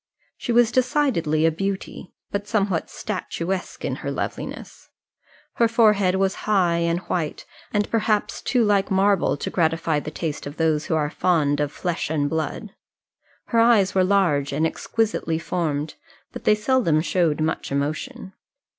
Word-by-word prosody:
She - - -4
was 235 -1 +4
decidedly 245 - +1
a 165 - +4
beauty, 195 +2 -4 0.2
but 200 0 -3
somewhat 200 -6 0
statuesque 185 -2 -4
in - - -2
her - - -5
loveliness. - - -6 0.7
Her 230 - +4
forehead 210 -5 +3
was 190 0 +1 0.2
high 180 -5 +3
and 170 0 +1
white, 165 -5 -3 0.3
but 205 -1 0
perhaps 215 -2 0
too 245 -3 +1
like 205 -2 +2
marble 195 -4 +2
to - - -4
gratify 165 -2 +1
the 150 - -6
taste 155 -2 -4
of 145 - -9
those 160 -2 +1
who 160 - 0
are 150 -1 0
fond 150 -5 +1
of 145 -1 0
flesh 175 -1 -3
and 150 -2 0
blood. 160 +8 -3 0.8
Her 230 - +2
eyes 225 -4 +4
were 190 - +3
large 180 -8 +2
and 150 +3 +1
exquisitely 210 -1 -1
formed, 155 -3 -2 0.4
but - - -9
they 210 - +5
seldom 210 - +2
showed 165 -3 +1
much 155 -2 -2
emotion. 155 - -3
180 Hz, 155 wpm, -23 LUFS, 155-210 Hz, 0.8 s, they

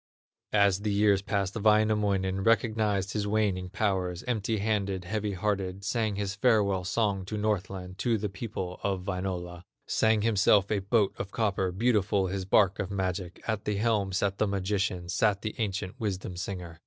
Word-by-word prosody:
As 100 -2 +4
the 105 0 -1
years 100 -1 +3
passed 100 -1 -1
Wainamoinen 105 -3 +2
Recognized 110 -4 +1
his 105 -1 -1
waning 100 -4 0
powers, 95 -3 -1
Empty 110 -3 -1
handed, 100 -3 -1
heavy 105 +1 -2
hearted, 95 0 -2
Sang 110 -1 0
his 100 -1 -2
farewell 100 -4 +2
song 100 0 0
to 105 +3 -4
Northland, 95 -3 -2
To 115 -2 +1
the 105 0 -2
people 95 -2 -5
of 95 -2 -1
Wainola; 90 -2 -4 0.2
Sang 110 -1 +2
himself 100 -2 +3
a 105 - +2
boat 100 +1 +1
of 95 - -4
copper, 100 -4 0
Beautiful 105 -1 +2
his 95 0 -3
bark 95 0 +3
of 100 - -2
magic; 95 -2 -3
At 110 -2 -2
the 105 - 0
helm 105 -2 +1
sat 100 +1 -1
the 110 - +2
magician, 95 -2 -1
Sat 100 +3 +1
the 110 - -3
ancient 100 +1 -3
wisdom 95 -4 -3
singer. 90 -2 -6
100 Hz, 165 wpm, -28 LUFS, 95-105 Hz, 0.2 s, As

